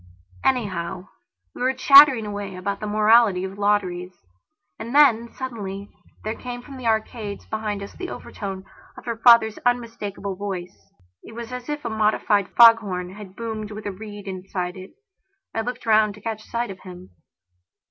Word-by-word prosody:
Anyhow, 185 -7 -1 0.4
we - - -10
were 260 +1 +1
chattering 275 -3 +8
away 205 -2 -5
about 200 +2 -3
the 215 - -5
morality 215 -2 +4
of 190 +1 -6
lotteries. 185 -3 0 0.6
And 230 +4 -6
then, 235 -6 +5
suddenly, 205 -6 -6 0.3
there 215 - -2
came 245 0 -7
from 275 0 -11
the 250 -2 -4
arcades 220 -2 -2
behind 210 -2 -4
us 200 - -9
the 365 -1 -6
overtones 195 -2 -7 0.3
of - - -12
her 235 -1 -2
father's 230 -2 +5
unmistakable 225 -5 -2
voice; 180 - -7 0.3
it 225 - -13
was 235 0 -7
as 250 +2 -7
if 295 -2 -4
a - - -1
modified 210 -2 +1
foghorn 205 -6 +5
had 200 -2 -11
boomed 220 -2 -5
with 215 0 -8
a 205 - -2
reed 205 +1 -10
inside 185 -1 -4
it. 185 0 -10 0.6
I 225 - -1
looked 245 +2 -5
round 215 -2 +3
to 210 - -15
catch 215 0 -5
sight 235 -2 -3
of 190 - -10
him. 180 -1 -12
215 Hz, 165 wpm, -23 LUFS, 195-235 Hz, 0.6 s, chattering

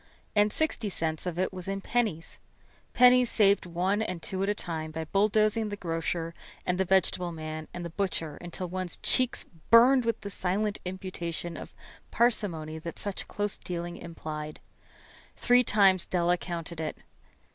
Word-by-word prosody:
And 210 0 +4
sixty 240 -8 -1
cents 160 -2 -3
of 175 -1 -3
it 185 +1 0
was 185 -1 -4
in 195 0 -2
pennies. 210 -7 -1 0.5
Pennies 250 0 +6
saved 200 -3 +3
one 185 +5 0
and 185 -5 -2
two 185 +4 -3
at 195 - +1
a 205 - +1
time 160 -5 -4
by 160 +1 -4
bulldozing 215 +3 +2
the 205 - -3
grocer 165 -2 -2 0.3
and 180 0 0
the 190 - +3
vegetable 180 -1 +2
man 155 -1 -6
and 175 0 -6
the 170 - -5
butcher 165 -5 -2
until 175 +1 -5
one's 185 0 -3
cheeks 255 -1 +2 0.2
burned 245 +3 +7
with 230 0 -1
the 200 - -6
silent 200 +3 -1
imputation 175 -2 -4
of - - -9 0.3
parsimony 170 -10 0
that 170 +1 -7
such 200 -2 -3
close 205 -1 -2
dealing 175 -1 -4
implied. 155 -3 -7 0.8
Three 245 +1 +5
times 195 -5 +4
Della 175 -1 +2
counted 170 -2 -5
it. 155 -1 -3
185 Hz, 160 wpm, -29 LUFS, 170-205 Hz, 0.8 s, burned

